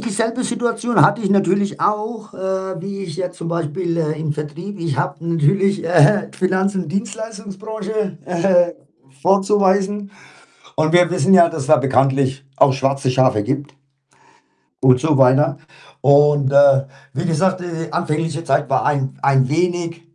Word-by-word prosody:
dieselbe 230 +2 -2
Situation 235 -1 -1
hatte 230 - +4
ich 195 - -1
natürlich 195 0 +1
auch, 215 +1 -2
äh, 190 -1 -4
wie 195 +1 -6
ich 170 -4 -8
jetzt 180 -1 -4
zum 165 - -7
Beispiel, 170 +1 -3
äh, 155 -2 -2
im 155 -2 -2
Vertrieb 160 +6 -7
ich 160 -4 -3
habe 180 +4 -1
natürlich, 170 +3 +1
äh, - - -3
hä, 175 +5 +4
Finanz 185 +2 0
und 180 -5 -4
Dienstleistungsbranche, 215 -1 -5
äh, 180 - -6
hä, 175 -1 +2 0.5
vorzuweisen. 200 +1 +1 0.7
Und 155 +1 +1
wir 175 -1 +4
wissen 185 +1 +2
ja, 170 -2 +6
dass 160 -3 -5
es - - -7
da 155 0 +5
bekanntlich 135 0 0
auch 140 - +4
schwarze 135 0 -1
Schafe 130 -4 +2
gibt. 140 +5 -4 1.1
Und 130 -1 +4
so 155 +1 +1
weiter. 140 +4 +3 0.4
Und, 145 0 +4
äh, 140 -1 +5 0.3
wie 150 +6 -3
gesagt, 185 +3 0
äh, 165 -2 -6
anfängliche 160 -1 -2
Zeit 145 -1 0
war 135 -1 0
ein 135 -2 -1
w - - -24
ein 135 -2 +2
wenig, 170 +1 -1
170 Hz, 160 wpm, -18 LUFS, 145-195 Hz, 1.1 s, ja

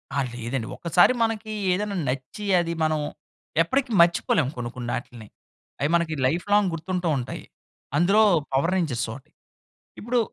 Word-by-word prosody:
ఆ! - - +1 0.2
లేదండి. 120 0 -3
ఒకసారి 175 +7 +4
మనకి 225 -1 -2 0.2
ఏదెనా 200 +2 -1
నచ్చి, 135 +10 -5 0.2
అది 170 0 -3
మనం 155 -1 +1 0.6
ఎప్పటికి 260 - 0
మర్చిపోలేము 170 -5 +2
కొన్ని 120 -1 -3
కొన్నాటిల్ని. 120 -2 -5 0.5
అయి 145 - +2
మనకి 170 -2 +1
లైఫ్‌లాంగ్ 195 +8 +2
గుర్తుంటూ 180 +2 -3
ఉంటాయి. 125 - -5 0.5
అందులో, 195 +7 +5 0.3
పవర్ 155 +7 +2
రేంజర్సోటి. 130 -7 -2 0.7
ఇప్పుడు 240 +3 0
170 Hz, 120 wpm, -25 LUFS, 130-200 Hz, 0.7 s, అందులో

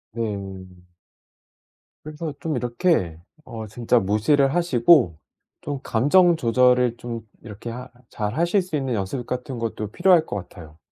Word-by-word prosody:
네. 100 -4 -4 1.4
그래서 155 0 -6
좀 155 -5 -2
이렇게 120 - 0 0.3
어 110 -1 -7
진짜 120 +3 +1
무시를 135 +8 +2
하시고 135 - +4 0.4
좀 145 -1 -4
감정 165 +9 +4
조절을 125 -1 +3
좀 115 -1 -6 0.2
이렇게 110 +1 -9
하 125 +2 -7 0.2
잘 105 +1 -4
하실 175 +5 +2
수 180 -3 -5
있는 135 -4 -1
연습 110 +5 -3
같은 125 0 -5
것도 110 -2 -4
필요할 175 - +3
것 - - -5
같아요. 85 -5 -9
120 Hz, 260 characters per minute, -23 LUFS, 110-150 Hz, 1.4 s, 하시고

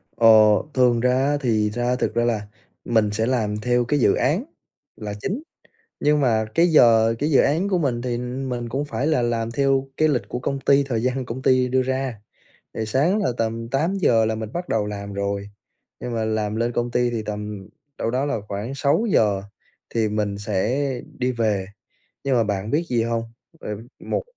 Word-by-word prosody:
Ờ, 115 - +4 0.5
thường 125 -2 +3
ra 125 +1 +2
á 140 +2 +1
thì 110 -4 +1
ra 120 +3 -1
thực 125 - -1
ra 120 - +2
là 110 -4 -1 0.4
mình 110 -3 +2
sẽ 110 +2 0
làm 110 -5 0
theo 120 0 +1
cái 145 +3 +1
dự 100 - +4
án - - +1 0.5
là 105 -1 -6
chính, 255 +10 -3 0.6
nhưng 150 0 +3
mà 110 -4 +2
cái 170 +1 +5
giờ 115 -7 +5
cái 150 +2 0
dự 135 - +5
án 170 +8 +1
của 185 - +2
mình 125 -7 0
thì 120 -1 -2
mình 125 -1 -4
cũng 140 +5 -2
phải 145 0 -2
là 155 -6 +2
làm 115 -1 -1
theo 135 +1 +1
cái 155 - +4
lịch 135 -5 0
của 125 - -3
công 135 +2 -2
ty 140 +1 +3
thời 120 -5 -2
gian 130 0 -1
công 125 +2 -6
ty 130 -1 +3
đưa 130 +1 +2
ra. 130 -4 -2 0.5
Thì 110 - -3
sáng 150 - +2
là 125 - +1
tầm 115 0 -2
8:00 140 - +2
là 110 0 0
mình 110 0 -6
bắt 175 +1 -4
đầu 105 -2 0
làm 100 -1 -6
rồi, 100 0 -3 0.5
nhưng 120 -1 -4
mà 110 -1 -1
làm 110 -1 -1
lên 120 +1 0
công 120 0 -1
ty 125 0 +1
thì 115 -2 -3
tầm 105 -2 -6 0.3
đâu 115 - -1
đó 130 +3 0
là 140 -7 -1
khoảng 105 +7 -4
6:00 140 - +2 0.5
thì 110 -2 +2
mình 105 -1 -2
sẽ 115 +7 -1 0.3
đi 125 0 0
về. 105 -5 0 0.6
Nhưng 135 -2 +1
mà 115 - +3
bạn 100 0 -2
biết 155 +4 +1
gì 120 -2 +1
hông? 115 0 -1 0.4
Ờ, - - -8 0.3
một - - -2
120 Hz, 200 wpm, -23 LUFS, 110-135 Hz, 0.6 s, cái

